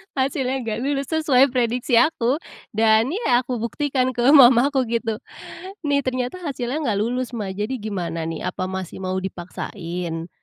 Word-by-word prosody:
Hasilnya 265 -1 0
nggak 225 -1 -3
lulus, 280 -1 -1
sesuai 285 -4 +4
prediksi 245 0 +1
aku, 260 -1 +3 0.3
dan 220 +3 +3
ya 300 - +2
aku 250 -1 -4
buktikan 255 +2 -1
ke 240 - -2
mamaku 265 -1 +6
gitu, 225 -1 -2 0.7
"Nih 280 -1 +1
ternyata 255 +5 -2
hasilnya 275 -1 -3
nggak 205 -3 0
lulus 250 +2 -2
Ma, 210 -4 -3
jadi 210 +7 -3
gimana 175 -6 -3
nih, 165 - -5
apa 185 0 -3
masih 190 0 -6
mau 185 0 -2
dipaksain 175 -2 -5
240 Hz, 150 wpm, -22 LUFS, 205-265 Hz, 0.7 s, mamaku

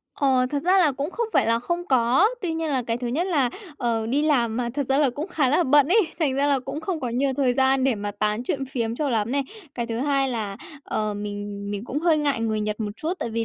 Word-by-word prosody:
Ờ, 260 -3 +2
thật 285 -1 -1
ra 370 +2 +4
là 320 -6 +4
cũng 280 +4 -3
không 470 +4 -2
phải 275 -5 +3
là 230 0 +3
không 345 +8 -3
có. 255 - +4 0.2
Tuy 345 -3 -1
nhiên 320 0 -2
là 265 -3 +1
cái 230 -1 -2
thứ 245 - -4
nhất 295 +10 0
là, 285 -9 +1 0.3
ờ, 230 -4 -1
đi 270 +6 +1
làm 240 -7 +2
mà 240 -1 -1
thật 285 -2 -1
ra 270 +1 +3
là 290 -3 +3
cũng 290 +6 -5
khá 290 -8 +1
là 300 +7 +3
bận 290 -1 +4
ấy, 420 +6 +5 0.2
thành 295 -6 +1
ra 280 +1 +2
là 280 -2 +3
cũng 270 +4 -6
không 335 -1 -3
có 255 - -2
nhiều 260 +4 0
thời 260 -3 +2
gian 265 0 +3
để 265 -2 +3
mà 205 -1 -4
tán 210 +2 0
chuyện 270 +1 -2
phiếm 235 -4 -2
cho 295 +1 -1
lắm 225 0 0
này. 280 0 +1 0.3
Cái 235 -1 -3
thứ 230 -1 -3
hai 275 0 +1
là, 215 -5 -3 0.3
ờ, 215 -1 -2
mình 205 0 -5
mình 205 +1 -4
cũng 260 +4 -3
hơi 325 0 +3
ngại 285 -5 0
người 220 -1 0
Nhật 210 +1 -3
một 210 -1 -2
chút, 320 +7 -2
tại 235 - -3
vì 230 0 -1
260 Hz, 275 wpm, -24 LUFS, 230-290 Hz, 0.3 s, ấy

